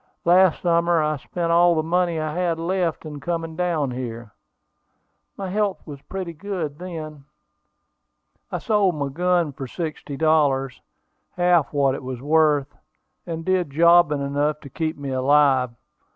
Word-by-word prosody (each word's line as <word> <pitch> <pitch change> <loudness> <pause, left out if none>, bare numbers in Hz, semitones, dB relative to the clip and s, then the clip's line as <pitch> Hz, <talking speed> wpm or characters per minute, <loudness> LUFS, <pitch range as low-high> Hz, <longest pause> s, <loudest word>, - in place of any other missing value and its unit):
Last 180 0 +4
summer 170 -1 +2
I 150 0 0
spent 170 +4 -3
all 170 0 +5
the 155 - 0
money 170 0 0
I 155 -1 -3
had 175 -1 0
left 170 -1 -2
in 150 -2 -7
coming 165 +1 -4
down 165 -6 -1
here. 120 -3 -6 1.1
My 195 -2 -5
health 205 -1 -1
was 145 -3 -9
pretty 185 -1 -6
good 165 -4 -5
then. 155 -5 -7 1.3
I - - -1
sold 205 -5 +1
my 140 -2 -2
gun 175 0 0
for 135 0 -7
sixty 155 -2 -6
dollars, 145 -4 +1 0.6
half 175 -4 +3
what 140 -2 +2
it - - -5
was 130 -2 -6
worth, 150 0 +2 0.5
and 165 -1 -5
did 185 -4 +1
jobbing 165 -1 +4
enough 145 +2 -1
to 140 - -11
keep 160 +2 -3
me 140 -1 -5
alive. 130 -1 +3
160 Hz, 150 wpm, -23 LUFS, 140-175 Hz, 1.3 s, all